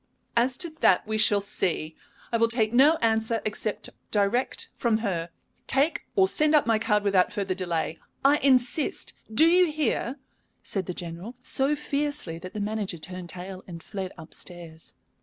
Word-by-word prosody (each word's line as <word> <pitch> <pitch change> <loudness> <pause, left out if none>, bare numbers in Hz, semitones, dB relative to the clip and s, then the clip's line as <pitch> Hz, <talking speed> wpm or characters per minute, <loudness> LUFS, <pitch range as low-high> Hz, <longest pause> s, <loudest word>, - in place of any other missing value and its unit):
"As 245 +2 +2
to 340 -3 -1
that, 180 - +4
we 215 0 -1
shall 205 -1 +5
see. 160 -5 -2 0.4
I 230 - +2
will 230 0 +4
take 230 -1 0
no 280 +6 +6
answer 225 0 +2
except 215 0 -3 0.2
direct 210 +5 0
from 235 -3 +1
her. 170 -4 -2 0.4
Take 280 +5 +1
or 385 -2 +5
send 305 -4 +3
up 295 - +4
my 225 -1 +2
card 210 -2 +1
without 195 -3 +3
further 200 -3 -2
delay. 170 -3 -2 0.3
I 285 +2 +6
insist! 260 +1 +1 0.2
Do 300 +9 +6
you 350 0 +5
hear?" 275 -4 -1 0.5
said 190 -4 -3
the 180 - -4
General, 175 +7 -7
so 275 +3 +2
fiercely 285 - -1
that 185 +3 -10
the - - -3
manager 205 -3 -2
turned 180 +2 -7
tail 185 +2 -7
and 170 -2 -9
fled 190 -2 -5
up 160 -1 -10
stairs. 170 -3 -7
215 Hz, 170 wpm, -26 LUFS, 185-265 Hz, 0.5 s, no